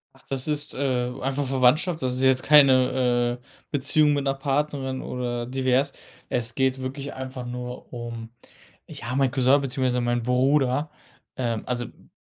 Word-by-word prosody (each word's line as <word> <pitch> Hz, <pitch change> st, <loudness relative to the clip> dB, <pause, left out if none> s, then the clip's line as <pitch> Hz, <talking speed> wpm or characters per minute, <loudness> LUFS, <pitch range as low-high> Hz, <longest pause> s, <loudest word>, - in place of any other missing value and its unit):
Ach, 135 Hz, -, -22 dB
das 135 Hz, 0 st, -1 dB
ist, 150 Hz, 0 st, 0 dB
äh, 125 Hz, -2 st, -1 dB
einfach 135 Hz, +1 st, -1 dB
Verwandtschaft, 135 Hz, +6 st, +2 dB
das 125 Hz, -1 st, -1 dB
ist 130 Hz, -, -3 dB
jetzt 130 Hz, -1 st, +4 dB
keine, 130 Hz, -4 st, +4 dB
äh, 125 Hz, -, -30 dB, 0.3 s
Beziehung 145 Hz, +1 st, +4 dB
mit 140 Hz, -1 st, 0 dB
'ner 135 Hz, -1 st, +1 dB
Partnerin 135 Hz, -1 st, -2 dB
oder 120 Hz, -1 st, -3 dB
divers. 130 Hz, +2 st, 0 dB, 0.4 s
Es 115 Hz, -2 st, -2 dB
geht 130 Hz, 0 st, 0 dB
wirklich 135 Hz, +2 st, -5 dB
einfach 130 Hz, -1 st, -7 dB
nur 125 Hz, +1 st, -7 dB
um, 115 Hz, -1 st, -6 dB, 0.6 s
ja 120 Hz, +2 st, -6 dB
mein 135 Hz, -1 st, +3 dB
Cousin 135 Hz, +1 st, +3 dB
beziehungsweise 125 Hz, -2 st, 0 dB
mein 120 Hz, -1 st, 0 dB
Bruder, 135 Hz, +3 st, +2 dB, 0.5 s
ähm, 115 Hz, -4 st, -2 dB
also, 120 Hz, -1 st, -2 dB
hm, -, -, -17 dB
130 Hz, 155 wpm, -24 LUFS, 125-140 Hz, 0.6 s, jetzt